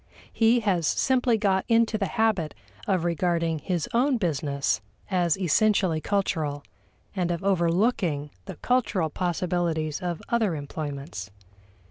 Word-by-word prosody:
He 230 +1 +4
has 180 -7 +1
simply 250 -3 +2
got 195 -3 +1
into 230 -1 +3
the 200 -3 0
habit 220 -9 0 0.3
of 185 -3 +1
regarding 170 -1 0
his 170 +1 -2
own 255 +3 +3
business 145 - -1 0.3
as 175 -3 +2
essentially 190 -2 +2
cultural 155 -8 -1 0.5
and 180 -3 0
of 170 0 -2
overlooking 175 - +1
the 190 - -7
cultural 205 -8 0
possibilities 170 -3 -1
of 175 -2 -3
other 220 -7 +1
employments. 145 - -6
175 Hz, 120 wpm, -26 LUFS, 160-210 Hz, 0.5 s, He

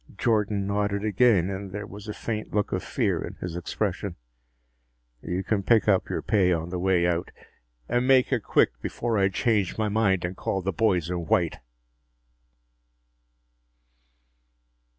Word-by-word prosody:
Jordan 105 -3 +1
nodded 100 0 -1
again 100 -3 +3
and 95 0 -6
there 105 +1 -5
was 105 +1 -10
a 105 - -4
faint 110 -2 -4
look 105 - 0
of - - -1
fear - - -1
in - - -7
his 90 -2 -6
expression. 95 +1 -3 1.1
"You 90 +2 -3
can 100 +1 0
pick 110 +2 +3
up 95 -3 +2
your - - -3
pay 95 -5 +3
on 85 0 -1
the 90 0 -3
way 90 -1 +2
out. 85 0 0 0.6
And 125 +1 +1
make 135 0 +4
it 120 - +1
quick, - - +2
before 115 -3 -1
I 95 0 +3
change 105 -2 0
my 110 -1 0
mind 100 -4 +1
and 90 +2 -4
call 95 0 -2
the 95 +1 -1
boys 90 -4 +1
in 85 -2 -3
white!" - - +1
100 Hz, 155 wpm, -26 LUFS, 90-110 Hz, 1.1 s, make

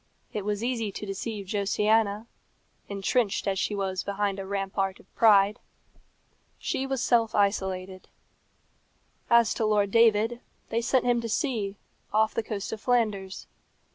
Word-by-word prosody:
It 210 - -3
was 205 +1 -2
easy 235 -4 -1
to 210 - -6
deceive 200 +1 -5
Josiana, 210 +2 +1 0.6
entrenched 200 +2 0
as 195 -1 0
she 210 - -1
was 190 -2 -2
behind 200 0 -2
a 190 - -6
rampart 195 -1 -2
of - - -22
pride. 210 -2 +5 1.0
She 270 - -2
was 270 -2 -1
self 230 -3 +2
isolated. 190 -2 -1 1.2
As 235 -1 +5
to - - -2
Lord 205 -2 +2
David, 230 +1 +3 0.3
they 230 - 0
sent 255 +1 +1
him 240 -1 +2
to 230 - -5
sea, 220 -7 -1 0.4
off 220 +1 +2
the - - 0
coast 210 -3 -5
of 215 - -6
Flanders. 210 -6 0
210 Hz, 140 wpm, -27 LUFS, 195-230 Hz, 1.2 s, pride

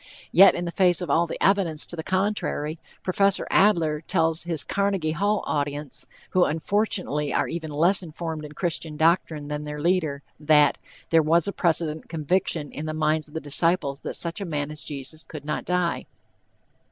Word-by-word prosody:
Yet 195 +3 +7
in 175 - -3
the 170 - -3
face 180 -2 +3
of 180 - -3
all 170 +1 +3
the - - -5
evidence 185 -6 +3
to - - -7
the 160 - -4
contrary, 185 -4 -1 0.2
Prof. 195 +1 +2
Adler 165 -7 +3
tells 165 -1 0
his 165 -4 -2
Carnegie 195 -5 0
Hall 205 +5 0
audience, 145 -1 -3 0.2
who 185 - +4
unfortunately 160 -3 0
are - - +1
even 165 -2 -5
less 170 +6 +3
informed 160 -2 -6
in 150 0 -9
Christian 160 -2 -3
doctrine 160 -2 +1
than 150 0 -4
their 150 0 -6
leader, 155 -4 0 0.2
that 150 -1 +4 0.3
"there 165 -1 +6
was 165 +3 +2
a - - 0
precedent 160 -2 -1
conviction 160 -1 -1
in 155 +2 -6
the 155 - -3
minds 155 0 0
of 150 - -17
the - - -1
disciples 145 -1 +1
that - - -5
such 170 +3 -3
a - - -1
man 150 -3 -3
as 155 - -5
Jesus 145 +2 -7
could 150 -2 -9
not 150 0 -3
die." 180 -1 -1
160 Hz, 180 wpm, -25 LUFS, 150-180 Hz, 0.3 s, Yet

